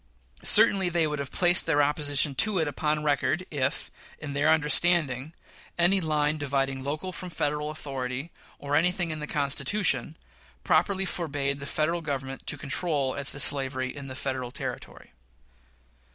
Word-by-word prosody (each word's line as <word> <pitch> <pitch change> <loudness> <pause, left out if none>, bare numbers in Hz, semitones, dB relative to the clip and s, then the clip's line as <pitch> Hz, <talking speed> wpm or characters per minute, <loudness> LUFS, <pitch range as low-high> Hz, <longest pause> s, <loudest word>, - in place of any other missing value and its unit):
Certainly 200 -4 +5
they 170 -2 +1
would 150 -1 -3
have 140 -1 -4
placed 175 -1 +3
their 145 -3 +3
opposition 145 0 +2
to 205 +9 +2
it 160 -3 +1
upon 150 +1 -1
record, 150 +4 0
if, 140 -1 -2 0.3
in 145 -2 -7
their 145 +2 +2
understanding, 155 -3 +2 0.5
any 180 +3 +3
line 155 -1 0
dividing 135 -2 -1
local 155 +7 -3
from 180 0 -7
Federal 150 -2 -2
authority, 135 0 -5 0.3
or 145 0 -3
anything 175 +1 +1
in 155 - -4
the 150 - -5
Constitution, 150 - 0 0.5
properly 195 -1 +2
forbade 145 -6 -2
the 140 - -7
Federal 165 +4 -1
Government 135 -3 -5
to - - +1
control 145 -2 -1
as 140 -1 -1
to 145 - -6
slavery 130 -2 +1
in 140 -2 -8
Federal 130 -2 -4
territory. - - -7
150 Hz, 150 wpm, -27 LUFS, 140-165 Hz, 0.5 s, Certainly